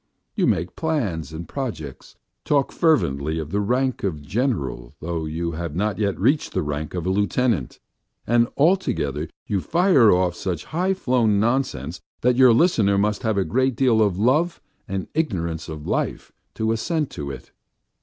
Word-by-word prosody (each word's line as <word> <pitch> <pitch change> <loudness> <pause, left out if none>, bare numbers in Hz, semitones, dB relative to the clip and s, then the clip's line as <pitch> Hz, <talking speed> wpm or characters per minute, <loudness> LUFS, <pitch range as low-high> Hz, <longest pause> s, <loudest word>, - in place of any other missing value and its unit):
You - - +1
make 85 +2 0
plans 105 - -2
and 80 +2 -7
projects, 105 - -6 0.3
talk 140 -2 +1
fervently 80 - +1
of 80 -1 -5
the 100 - 0
rank 125 +5 0
of 80 -7 -2
general 70 - -2
though 85 0 -3
you 85 +2 -3
have 85 -1 -5
not 100 +1 -1
yet 100 -4 0
reached 135 +10 +1
the - - 0
rank 75 +2 -4
of 90 -2 -3
a 95 - +1
lieutenant, 100 - 0 0.5
and 120 +1 +3
altogether 140 - +1 0.2
you 100 -3 -1
fire 170 - +4
off 90 -1 +2
such 90 -2 -4
high 185 +4 0
flown 120 - +2
nonsense 105 - -1 0.2
that 125 0 +3
your 130 -1 +7
listener 115 - +3
must 105 +1 +1
have 110 -3 0
a 95 - +2
great 130 +7 +1
deal 120 -3 +3
of 100 -4 +2
love 150 - +2 0.3
and 95 -1 -3
ignorance 85 - -2
of 75 -1 -7
life - - -2 0.2
to 110 0 0
assent 150 +6 -1
to 70 -1 -5
it. 70 - -9
100 Hz, 165 wpm, -23 LUFS, 80-130 Hz, 0.5 s, your